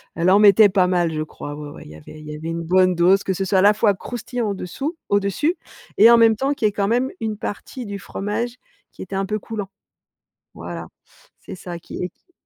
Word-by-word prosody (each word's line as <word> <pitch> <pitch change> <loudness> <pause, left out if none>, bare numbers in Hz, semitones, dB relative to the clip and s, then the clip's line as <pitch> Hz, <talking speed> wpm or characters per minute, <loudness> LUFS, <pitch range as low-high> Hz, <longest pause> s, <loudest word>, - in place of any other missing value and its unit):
elle 170 +2 +2
en 195 - +6
mettait 210 0 +7
pas 185 -1 +3
mal, 175 -2 +1
je 155 -1 -3
crois. 145 -1 -8
Ouais 150 -1 -8
ouais. - - -11
Il - - -12
y - - -11
avait 80 - -13
il 155 - -12
y - - -6
avait 160 +2 -6
une 165 0 -3
bonne 185 +2 +3
dose, 185 +3 +4
que 190 - -1
ce 195 +1 -2
soit 190 +1 +1
à - - +4
la 205 +1 +6
fois 210 -1 +2
croustillant 240 +2 -4
au-dessous 270 - -5
au-dessus 205 - +1 0.4
et 225 +3 +8
en 235 - +7
même 225 -1 +5
temps 270 +6 0
qu'il 225 - +1
y - - +2
ait - - -7
quand 200 0 -1
même 245 +4 +1
une 220 -1 -3
partie 240 +4 -6
du 200 - -5
fromage 215 +5 -4 0.3
qui - - -13
était 190 +1 -6
un 195 - 0
peu 210 +2 -2
coulant. 210 -2 -6 0.8
Voilà, 85 -1 -7 0.6
c'est - - -8
ça 175 -1 -8
qui 170 - -7
est 180 - -9
195 Hz, 240 wpm, -21 LUFS, 175-220 Hz, 0.8 s, et